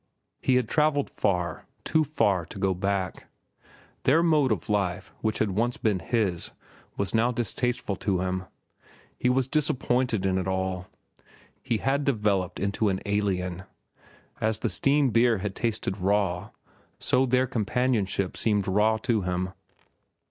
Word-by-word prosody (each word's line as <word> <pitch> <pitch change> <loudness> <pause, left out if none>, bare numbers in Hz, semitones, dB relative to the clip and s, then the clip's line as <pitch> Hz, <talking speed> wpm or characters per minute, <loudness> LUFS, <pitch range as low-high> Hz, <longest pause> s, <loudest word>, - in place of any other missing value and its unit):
He 130 - +3
had 125 -3 +2
travelled 150 +1 +1
far, 90 -5 -1 0.2
too 160 - +2
far 100 - +1
to - - -9
go 95 -1 +2
back. 95 0 -2 0.7
Their 160 +6 +4
mode 150 -6 +3
of 100 -6 -1
life, 100 -4 -1
which 110 -1 0
had 105 -2 +1
once 115 +5 0
been 105 -4 +1
his, 95 -2 -1 0.4
was 100 -1 -1
now 115 +2 +3
distasteful 120 -2 -1
to 95 -3 0
him. 95 0 -2 0.7
He 125 - +2
was 130 0 +2
disappointed 125 - +1
in 95 -1 +1
it 95 - -3
all. 95 -1 -2 0.7
He 120 -4 0
had 135 +5 0
developed 105 -8 0
into 100 +1 0
an 95 -1 -1
alien. 95 -3 -1 0.8
As 110 0 +1
the 115 - -1
steam 140 +8 +3
beer 115 +1 +4
had 100 +1 -3
tasted 110 -4 -2
raw, 95 -2 0 0.5
so 130 +1 +2
their 130 +1 +3
companionship 110 -5 0
seemed 105 -3 +1
raw 105 +3 +3
to 115 -4 +1
him. 90 0 -2
105 Hz, 145 wpm, -27 LUFS, 95-125 Hz, 0.8 s, Their